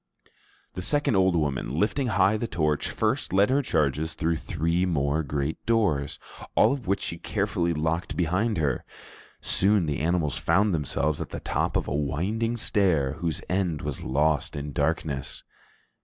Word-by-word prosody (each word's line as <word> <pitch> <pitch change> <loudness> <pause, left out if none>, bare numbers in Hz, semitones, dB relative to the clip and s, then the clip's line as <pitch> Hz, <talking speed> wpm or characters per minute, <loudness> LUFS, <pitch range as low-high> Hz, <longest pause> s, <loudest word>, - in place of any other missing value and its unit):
The 90 - -5
second 145 +3 +1
old 95 -1 +3
woman, 75 -3 -1
lifting 125 +6 +1
high 95 -1 +3
the 115 +2 -2
torch, 75 -5 0
first - - -1
led 100 +5 +3
her 140 +2 +3
charges 80 - 0
through 80 +1 0
three 85 +3 -1
more 75 -3 +1
great 70 +1 -3
doors, 95 -12 +1 0.4
all - - +5
of 135 -5 -6
which 100 - 0
she 85 - -4
carefully 100 -2 -1
locked 80 +2 -2
behind 95 +6 +1
her. 70 -5 0 0.6
Soon 100 -2 +4
the 75 -3 -2
animals 80 -2 0
found 100 0 +2
themselves 75 -1 -1
at - - -5
the - - -6
top - - -1
of - - -3
a - - -2
winding 95 - -1
stair 90 - +2
whose 85 -3 -2
end 90 -5 -1
was 75 -2 -4
lost 75 +3 0
in 75 0 -5
darkness. 70 -1 -2
85 Hz, 160 wpm, -26 LUFS, 75-100 Hz, 0.6 s, all